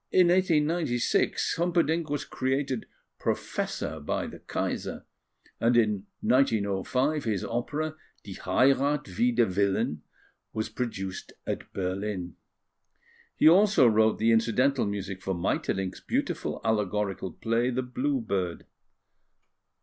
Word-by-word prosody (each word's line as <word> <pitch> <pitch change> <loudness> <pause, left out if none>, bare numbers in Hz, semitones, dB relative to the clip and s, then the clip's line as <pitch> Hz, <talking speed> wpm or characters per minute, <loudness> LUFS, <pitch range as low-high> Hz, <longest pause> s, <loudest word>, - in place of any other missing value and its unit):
In 180 -2 +5
1896, 165 -7 +1
Humperdinck 170 -2 +1
was 145 -1 -2
created 130 -2 -2 0.3
Professor 80 - -2
by 75 - -2
the - - -9
Kaiser; - - -3 0.5
and 120 +1 +3
in 105 -3 +1
1905, 125 +4 +1
his 105 -5 -1
opera, 150 +6 -2 0.3
Die - - -8
Heirath 140 +2 +2
Wider 120 0 +4
Willen, 95 -6 0 0.5
was 110 0 -2
produced 110 -5 -5
at - - -4
Berlin. 95 -1 -3 1.0
He - - +5
also 195 -3 +6
wrote 110 -1 +4
the 115 +1 +3
incidental 120 +3 +2
music 100 -2 -4
for 95 0 -2
Maeterlinck's 95 +2 -2
beautiful - - -2
allegorical 105 -3 -1
play, 115 +2 0
The 130 +1 -1
Blue 260 - -1
Bird. 90 - -2
115 Hz, 110 wpm, -28 LUFS, 100-145 Hz, 1.0 s, also